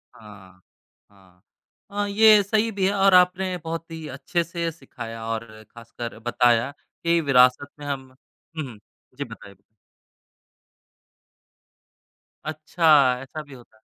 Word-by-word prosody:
हाँ, 95 -4 -15 0.5
हाँ। 95 -3 -24 0.5
हाँ, 205 0 -1
ये 215 0 +6
सही 220 +2 +1
भी 195 -2 -1
है 200 - +1
और 195 -1 +4
आपने 180 +1 +4
बहुत 165 0 -5
ही 160 -1 -7
अच्छे 170 +5 -1
से 170 -1 -3
सिखाया 115 -6 -9
और 115 0 -3 0.3
ख़ासकर 115 0 -8
बताया 120 +2 +2 0.3
कि 170 0 +3
विरासत 130 -1 +4
में 145 - -8
हम 135 -2 -4 0.5
हुँ, 155 - -2
हुँ, 110 - -12 0.4
जी, - - -2
बताएँ। 100 -1 -12 2.9
अच्छा 155 +2 0 0.3
ऐसा 135 +4 -7
भी 145 - -15
होता 120 -3 -16
है? - - -31
145 Hz, 130 wpm, -24 LUFS, 115-180 Hz, 2.9 s, ये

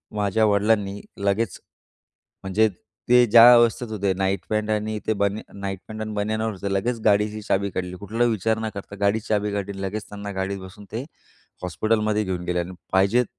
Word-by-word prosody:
माझ्या 105 +1 +2
वडिलांनी 100 -1 +1 0.2
लगेच 100 +1 0 0.8
म्हणजे 100 +3 +3 0.4
ते 125 0 +7
ज्या 115 +2 +9
अवस्थेत 120 0 +3
होते 100 -3 0
नाईट 95 -1 -1
पॅन्ट 110 0 -1
आणि 110 0 -1
ते 110 - +3
बनी 100 +1 +1 0.2
नाईट 95 -1 -4
पॅन्ट 110 0 -7
आणि 110 0 -4
बनियनवर 110 +2 -1
होते 100 +1 -4
लगेच 115 +5 -1
गाडीची 105 0 +2
चाबी 100 -1 0
काढली, 90 0 -4
कुठलाही 115 +5 0
विचार 110 +1 0
न 110 0 -2
करता 100 0 -7
गाडी 100 +2 +3
चाबी 105 -2 -1
काढली 100 -1 -3
आणि 95 - -8
लगेच 105 +2 -5
त्यांना 100 0 -6
गाडीत 95 +1 -2
बसून 95 +2 -11
ते 115 +3 -3 0.6
हॉस्पिटलमध्ये 110 +4 0
घेऊन 95 -3 -3
गेले. 90 0 0
आणि 85 +1 -4 0.2
पाहिजेत 100 +6 +3
105 Hz, 180 wpm, -24 LUFS, 100-110 Hz, 0.8 s, ज्या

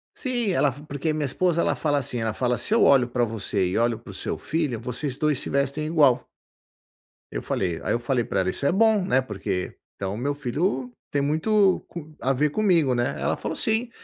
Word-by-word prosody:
Sim 240 -6 -1
ela 145 -5 +2 0.2
porque, 150 +3 -2
minha 150 -1 -1
esposa 170 +5 +1
ela - - +1
fala 145 -2 0
assim, 125 -2 -3
ela 110 -1 -1
fala: 125 +1 0
"Se 215 - 0
eu 230 - +5
olho 130 -3 +5
pra 120 0 0
você 105 -4 -1
e 90 - -1
olho 115 -1 +1
pro - - -11
seu - - -3
filho, 150 -8 -2
vocês 125 +3 -3
dois 150 -3 +1
se - - -5
vestem 140 +2 0
igual." 150 -6 +3 1.1
Eu - - -3
falei 85 -4 -2
aí - - 0
eu 120 - 0
falei 120 0 0
pra 95 - -1
ela: 95 -1 +1
"isso 140 - -3
é - - +4
bom, 215 0 +3
né, 130 -8 +2
porque, 100 -5 -4 0.2
então 95 0 -3
o - - -5
meu 140 +4 -1
filho 135 -1 -2 0.2
tem 145 - +1
muito 190 +7 +2
com 155 -2 -9
a 135 - +1
ver 150 +3 +2
comigo 170 -11 +3
né?". 120 0 0
Ela - - +1
falou: - - -4
"sim, 225 +2 0
140 Hz, 220 wpm, -25 LUFS, 120-165 Hz, 1.1 s, eu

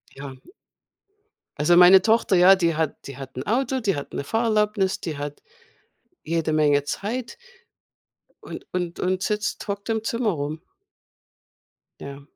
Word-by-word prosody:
Ja. 135 -1 -9 1.2
Also, 160 +4 +4
meine 180 +2 +8
Tochter. 225 -3 +2
Ja, 185 +2 +7
die 170 -3 0
hat 160 -3 -3
die 140 - -9
hat 135 -1 -10
'n 130 - -4
Auto. 260 +4 0
Die 200 -8 0
hat 140 - -7
'ne - - -3
Fahrerlaubnis. 210 -1 0
Die 160 -4 -5
hat 145 0 -7 0.8
jede 160 -1 -1
Menge 145 -2 +3
Zeit 235 +8 -4 1.1
und - - -9
und 175 -2 -4
und 185 0 -1
sitzt 210 +1 -3
hockt 200 +2 -5
im 220 -1 -1
Zimmer 230 0 -1
rum. 150 +1 -5 1.4
Ja, 140 0 -9
180 Hz, 140 wpm, -23 LUFS, 150-210 Hz, 1.4 s, meine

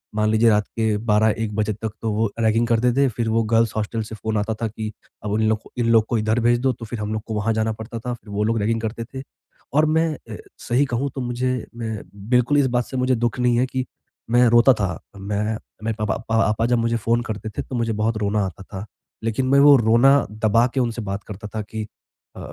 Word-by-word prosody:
मान 105 0 +2
लीजिए 110 +1 +4
रात 105 -1 +2
के 110 -1 +2
12-1 105 0 +2
बजे 110 0 0
तक 110 +1 -5
तो 110 - 0
वो 110 +1 +1
रैगिंग 115 +1 +2
करते 120 +1 +3
थे, 140 +2 +3
फिर 115 0 -2
वो 115 +1 +2
गर्ल्स 115 0 +2
हॉस्टल 110 +1 -2
से 110 +1 -8
फ़ोन 110 0 -2
आता 105 +2 -1
था 115 - +1
कि, 110 0 -5 0.3
अब 105 - -3
उन 110 - +1
लोग 110 -1 0 0.2
इन 120 -1 +1
लोग 115 -1 +5
को 120 - +1
इधर 110 +2 +1
भेज 120 +1 +3
दो, 130 +1 +2
तो 115 0 -9
फिर 115 +1 -6
हम 105 0 -3
लोग 110 -1 -3
को 110 - -4
वहाँ 110 +2 0
जाना 110 0 0
पड़ता 115 +1 -6
था 125 +2 -4
फिर 110 - -18
वो 105 +1 -1
लोग 115 +1 +1
रैगिंग 115 +2 0
करते 115 +1 -3
थे। 130 - -5 0.5
और 150 +2 +4
मैं 160 +1 +2
अ, - - -10 0.2
सही 130 +4 +1
कहूँ 130 +1 -1
तो 135 - -3
मुझे 125 +1 -1 0.2
मैं 110 -3 -4 0.3
बिल्कुल 125 +3 +3
इस 135 - +3
बात 120 -1 +2
से 130 - -6
मुझे 130 0 +2
दुःख 120 +1 -1
नहीं 125 -1 +3
है 130 - +3
कि 130 0 -3 0.5
मैं 120 +1 +5
रोता 120 +3 +6
था, 100 -7 -2 0.2
मैं 105 +2 -2 0.3
मैं 110 +1 -1
पप 105 0 0
अ, - - 0
पापा 115 0 +2
जब 120 0 +2
मुझे 115 0 +1
फ़ोन 115 +2 +1
करते 105 +1 -5
थे - - 0
तो 130 - -7
मुझे 115 -2 0
बहुत 110 +1 +1
रोना 105 -1 0
आता 95 +1 -7
था। 95 +1 -8 0.4
लेकिन 115 +3 0
मैं 140 +1 +5
वो 145 0 +8
रोना 120 +4 +5 0.2
दबा 110 +2 +2
के - - +2
उनसे 120 -2 -1
बात 100 0 -4
करता 105 0 -8
था 110 - -1
कि 110 +1 -5 0.5
अ, - - -9
115 Hz, 250 wpm, -22 LUFS, 110-120 Hz, 0.5 s, वो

